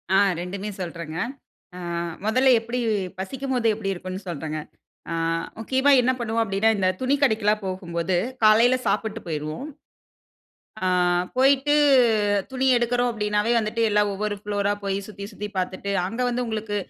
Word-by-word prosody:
ஆ - - +6 0.2
2மே 195 +3 -5
சொல்றேங்க. 170 -2 -6 0.6
அ - - -7 0.5
முதல்ல 255 +5 +3
எப்புடி 235 +2 -4 0.4
பசிக்கும்போது, 255 +3 -2
எப்புடி 195 -2 -2
இருக்குன்னு 185 +1 -6
சொல்றேங்க. 155 -1 -4 0.5
ஆ, - - -1 0.5
முக்கியமா 265 +5 +2
என்ன 250 +1 +2
பண்ணுவோம் 230 -1 0
அப்டினா, 200 +1 +1
இந்த 190 -2 +1
துணி 260 +2 +2
கடைக்குலா 215 -4 +3
போகும்போது, 180 -1 -2 0.3
காலையில 225 +4 +6
சாப்பிட்டு 220 0 -1
போய்ருவோம். 155 - -4 1.2
அ - - +1 0.5
போயிட்டு 275 +2 +4 0.8
துணி 265 0 0
எடுக்குறோம் 245 +1 +1
அப்டின்னாவே 210 +1 0
வந்துட்டு, 220 +2 -2
எல்லா 210 0 +4
ஒவ்வொரு 205 +1 -2
ஃப்ளோர் 205 -1 -1
ரா 205 - +2
போய் 195 0 -1
சுத்தி 200 -1 -8
சுத்தி 210 +1 -6
பாத்துட்டு, 185 +2 -3 0.2
அங்க 230 +6 -5
வந்து 245 +1 -1
உங்களுக்கு, 215 -2 -3
210 Hz, 140 wpm, -24 LUFS, 190-240 Hz, 1.2 s, ஆ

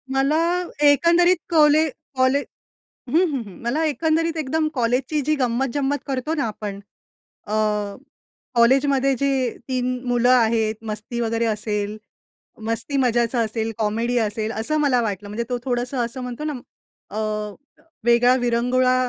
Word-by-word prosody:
मला 275 +3 +2 0.5
एकंदरीत 340 +5 +5
कॉले 310 -1 +5 0.3
कॉले 260 +2 +3 0.7
हं, 320 - +3
हं, 265 -4 -2
हं. 195 - -11
मला 280 +7 0
एकंदरीत 320 +2 0
एकदम 310 +2 0
कॉलेजची 250 +4 0
जी 305 - +4
गंमत-जंमत 270 +2 0
करतो 270 +3 -2
ना - - +1
आपण. 205 -2 -6 0.7
अ, 210 - -6 1.0
कॉलेजमध्ये 270 +3 +3
जे 280 - +2 0.4
3 255 -1 -1
मुलं 245 0 +2
आहेत. 225 -3 +3 0.2
मस्ती 220 +3 -5
वगैरे 230 0 0
असेल, 210 -1 -2 0.7
मस्ती 230 +5 -2
मजाचं 240 -1 +1
असेल, 220 +1 -3
कॉमेडी 230 +3 0
असेल 220 0 -1
असं 305 +7 -1
मला 270 -4 +3
वाटलं. 205 -2 -3
म्हणजे 225 +3 -3
तो 245 - 0
थोडंसं 245 +1 -2
असं 255 +3 -6
म्हणतो 250 +4 -5
ना, 305 - -2 0.6
अ, 215 - -5 0.9
वेगळा 240 +1 +5
विरंगुळा 250 +2 +2
250 Hz, 130 wpm, -22 LUFS, 230-280 Hz, 1.0 s, एकंदरीत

